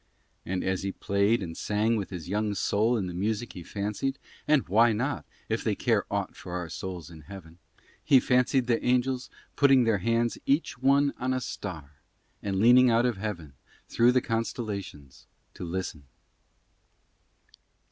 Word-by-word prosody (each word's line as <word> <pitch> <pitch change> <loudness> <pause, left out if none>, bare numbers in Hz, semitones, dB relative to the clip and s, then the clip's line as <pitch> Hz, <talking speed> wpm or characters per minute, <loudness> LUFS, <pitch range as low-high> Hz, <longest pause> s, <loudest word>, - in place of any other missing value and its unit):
And 95 0 -2
as 95 -1 -1
he 95 - -2
played 100 +3 +1
and 80 -2 -6
sang 110 +2 0
with 100 -3 -3
his 90 -3 -7
young 105 +2 -1
soul 110 +5 +1
in 100 - -2
the 90 - -5
music 110 +5 -2
he 90 - -8
fancied 105 +9 -3 0.3
(and 150 -3 +3
why 110 +5 +4
not, 130 +7 -2 0.2
if - - -2
they - - 0
care - - +1
aught - - -2
for 90 - -9
our 90 -2 -4
souls 90 -1 -6
in 80 -2 -12
Heaven?) 85 -1 -12 0.4
he 135 - +6
fancied 125 +1 +2
the 120 -1 +1
angles 125 +1 +1 0.3
putting 135 -3 +5
their 115 -4 +2
hands 115 +4 0
each 140 -1 +1
one 140 +2 +3
on 130 +1 0
a - - 0
star 80 - -7 0.4
and 100 -1 -2
leaning 125 +4 +6
out 115 +1 +3
of 120 -4 0
Heaven 90 -8 -5 0.4
through 120 +1 +4
the 125 - +3
constellations 105 - -5 0.3
to - - -8
listen. 85 -5 -5
105 Hz, 165 wpm, -28 LUFS, 95-125 Hz, 0.4 s, he